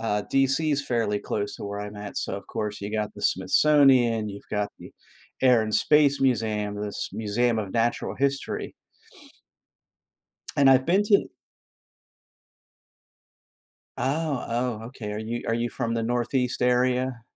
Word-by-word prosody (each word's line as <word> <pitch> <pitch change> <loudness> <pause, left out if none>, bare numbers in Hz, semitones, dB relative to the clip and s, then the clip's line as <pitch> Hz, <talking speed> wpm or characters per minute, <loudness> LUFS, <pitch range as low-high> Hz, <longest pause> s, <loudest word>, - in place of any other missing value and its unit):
uh, 105 -2 -1
DC 135 +3 +2
is 145 0 -1
fairly 115 -4 0
close 100 -1 -3
to - - -8
where 100 0 -5
I'm 105 0 -7
at, 105 0 -8
so, - - -3
of 100 - -10
course, 105 -1 -4
you 100 +1 -5
got 105 -1 -2
the - - -10
Smithsonian, 120 +1 +4
you've 100 0 -10
got 105 -1 -1
the - - -12 0.5
Air 125 -4 +5
and 110 -1 -2
Space 145 -2 +4
Museum, 110 -5 0
this 105 -1 -4
Museum 115 +2 0
of 100 -3 -4
Natural 120 0 0
History. 140 0 -2 1.8
And 140 -1 +5
I've 130 0 +5
been 185 +5 +3
to 205 -1 +3 2.7
Oh, 145 0 -1
oh, 120 -1 -2
okay. 115 -4 -7
Are 105 - -4
you 115 +2 -4
are - - 0
you 120 +1 -1
from 115 +1 -3
the 115 0 -1
Northeast 125 +2 -1
area? 125 0 +1
120 Hz, 150 wpm, -25 LUFS, 105-135 Hz, 2.7 s, Air